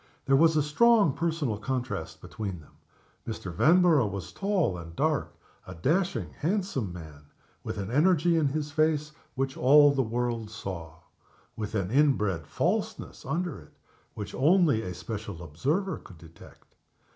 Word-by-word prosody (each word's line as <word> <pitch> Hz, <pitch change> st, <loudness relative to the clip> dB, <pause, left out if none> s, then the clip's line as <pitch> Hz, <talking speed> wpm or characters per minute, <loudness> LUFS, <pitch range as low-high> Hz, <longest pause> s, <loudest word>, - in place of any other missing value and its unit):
There 135 Hz, -, +4 dB
was 160 Hz, +2 st, +4 dB
a 150 Hz, -, +3 dB
strong 205 Hz, -, +4 dB
personal 160 Hz, -10 st, -1 dB
contrast 125 Hz, -7 st, -4 dB
between 100 Hz, -5 st, -6 dB
them. 75 Hz, -, -18 dB, 0.6 s
Mr. 100 Hz, -5 st, -5 dB
Vanborough 155 Hz, -, +4 dB
was 95 Hz, -2 st, -6 dB
tall 195 Hz, -, 0 dB
and 85 Hz, -1 st, -9 dB
dark -, -, 0 dB, 0.3 s
a 95 Hz, -, -8 dB
dashing, 175 Hz, -, 0 dB
handsome 175 Hz, -, -1 dB
man; 80 Hz, -4 st, -11 dB, 0.4 s
with -, -, -5 dB
an 100 Hz, +1 st, -4 dB
energy 170 Hz, +4 st, +3 dB
in 160 Hz, -3 st, +2 dB
his 150 Hz, +1 st, -3 dB
face 155 Hz, 0 st, +1 dB, 0.2 s
which 135 Hz, 0 st, -2 dB
all 145 Hz, +3 st, +6 dB
the 135 Hz, -, +1 dB
world 120 Hz, -2 st, -2 dB
saw; 85 Hz, -8 st, -7 dB, 0.5 s
with 105 Hz, 0 st, -5 dB
an 95 Hz, -2 st, -1 dB
inbred 105 Hz, -, +2 dB
falseness -, -, -2 dB
under 175 Hz, -2 st, -2 dB
it -, -, -19 dB, 0.4 s
which 105 Hz, -1 st, -6 dB
only 155 Hz, -, +3 dB
a 90 Hz, -3 st, -6 dB
special 105 Hz, -6 st, -6 dB
observer 145 Hz, -, -1 dB
could 90 Hz, -, -14 dB
detect. 80 Hz, 0 st, -17 dB
130 Hz, 145 wpm, -28 LUFS, 95-155 Hz, 0.6 s, all